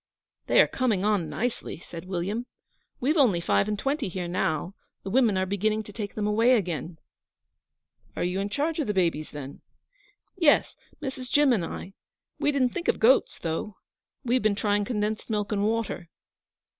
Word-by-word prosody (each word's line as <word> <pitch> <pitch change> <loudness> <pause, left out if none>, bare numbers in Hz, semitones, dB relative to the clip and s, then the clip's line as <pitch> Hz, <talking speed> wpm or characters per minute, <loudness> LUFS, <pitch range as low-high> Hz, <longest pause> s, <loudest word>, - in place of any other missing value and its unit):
'They - - +4
are - - +7
coming 220 -7 0
on 205 -6 +1
nicely,' 245 +1 -3
said 170 0 -9
William. 195 +7 -2 0.5
'We've 295 +7 +1
only 230 - +4
five 185 +3 +2
and 210 -1 -1
twenty 275 +3 -1
here 180 -1 -4
now. 175 0 -1 0.3
The 195 - -5
women 235 -5 +3
are 185 - +1
beginning 215 +3 0
to 210 - -12
take 205 -1 -5
them 210 - -1
away 225 +4 +4
again.' 175 -5 -2 1.2
'Are - - -1
you 180 +2 -1
in 200 +1 -2
charge 305 +7 -1
of 300 - 0
the 210 - -1
babies, 165 -4 +1
then?' 145 -1 -8 0.7
'Yes 330 -6 +3 0.3
Mrs. 260 -2 -5
Jim 290 -2 +5
and 200 -7 +1
I. 185 +3 -6 0.5
We 295 - +2
didn't 265 -3 +2
think 340 +7 -5
of - - +3
goats, 250 +5 +4
though. 170 +5 -4 0.5
We've 250 0 +2
been 215 -1 +2
trying 205 0 +1
condensed 215 0 -2
milk 210 -1 -1
and 200 -1 +1
water.' 215 -5 -1
210 Hz, 175 wpm, -27 LUFS, 185-245 Hz, 1.2 s, are